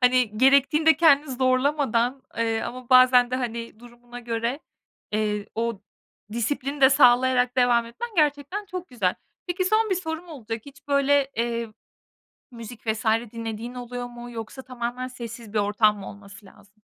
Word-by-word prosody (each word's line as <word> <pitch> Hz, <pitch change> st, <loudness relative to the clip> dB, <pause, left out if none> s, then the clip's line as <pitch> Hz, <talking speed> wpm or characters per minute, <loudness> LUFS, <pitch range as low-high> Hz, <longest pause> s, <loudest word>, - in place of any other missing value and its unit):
hani, 250 Hz, -4 st, +2 dB
gerektiğinde 280 Hz, +4 st, +4 dB
kendini 300 Hz, -3 st, +4 dB
zorlamadan, 255 Hz, -1 st, +1 dB
eee, 225 Hz, -1 st, 0 dB
ama 250 Hz, 0 st, -7 dB
bazen 255 Hz, -1 st, +6 dB
de, 255 Hz, -, 0 dB
hani, 230 Hz, -2 st, -5 dB
durumuna 240 Hz, 0 st, -12 dB
göre, 235 Hz, +4 st, -3 dB, 0.5 s
eee, 210 Hz, -1 st, -1 dB
o 230 Hz, -2 st, -2 dB, 0.5 s
disiplini 275 Hz, +4 st, -2 dB
de 265 Hz, 0 st, +7 dB
sağlayarak 250 Hz, -1 st, +4 dB
devam 240 Hz, -2 st, +3 dB
etmen 360 Hz, -, -6 dB
gerçekten 300 Hz, +6 st, 0 dB
çok 365 Hz, -1 st, -7 dB
güzel. 205 Hz, -8 st, -1 dB, 0.3 s
Peki, 360 Hz, +1 st, -1 dB
son 435 Hz, +2 st, +2 dB
1 -, -, +3 dB
sorum 340 Hz, -1 st, -5 dB
olacak, 230 Hz, -7 st, -6 dB
hiç 290 Hz, +1 st, -15 dB
böyle, 280 Hz, -1 st, +2 dB
eee, 235 Hz, 0 st, -2 dB, 0.8 s
müzik 230 Hz, -1 st, -11 dB
vs. 220 Hz, +2 st, -2 dB, 0.3 s
dinlediğin 230 Hz, +1 st, -6 dB
oluyor 245 Hz, 0 st, -6 dB
mu 240 Hz, 0 st, -10 dB
yoksa 230 Hz, +3 st, -7 dB
tamamen 250 Hz, 0 st, -5 dB
sessiz 235 Hz, -3 st, -9 dB
bir 210 Hz, -, +1 dB
ortam 210 Hz, +1 st, +2 dB
mı 195 Hz, -, -8 dB
olması 200 Hz, 0 st, -13 dB
lazım? 200 Hz, +2 st, -20 dB
245 Hz, 150 wpm, -24 LUFS, 230-275 Hz, 0.8 s, de